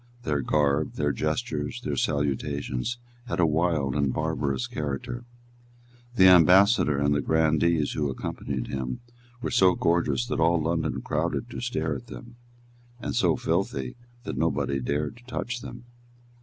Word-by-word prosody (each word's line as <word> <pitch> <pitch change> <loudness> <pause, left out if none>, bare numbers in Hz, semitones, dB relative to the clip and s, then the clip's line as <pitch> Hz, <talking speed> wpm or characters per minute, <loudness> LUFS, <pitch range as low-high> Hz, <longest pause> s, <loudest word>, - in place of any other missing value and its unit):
Their 75 -2 0
garb, 75 +2 +1
their 75 0 0
gestures, - - -2
their - - -2
salutations, 70 - -1 0.3
had - - -3
a 85 - +5
wild 80 -4 +1
and 70 -2 +1
barbarous 70 -4 -1
character. 75 - -4 0.9
The 95 -4 +7
ambassador 90 -2 +6
and 70 +1 +2
the 70 - +1
grandees 80 +1 +2
who 75 -2 -1
accompanied 65 -1 -4
him 65 -2 -4 0.4
were - - -2
so 90 -1 +5
gorgeous 75 -7 +1
that - - -3
all 85 +1 +3
London 80 0 -1
crowded 85 +10 -2
to - - -6
stare 120 0 -1
at 120 - -8
them, 120 -1 -11 0.6
and - - -4
so - - +3
filthy 65 -2 -1 0.3
that - - -4
nobody 70 0 0
dared 70 - -2
to 120 - -17
touch 125 0 -4
them. - - -9
75 Hz, 145 wpm, -26 LUFS, 70-90 Hz, 0.9 s, The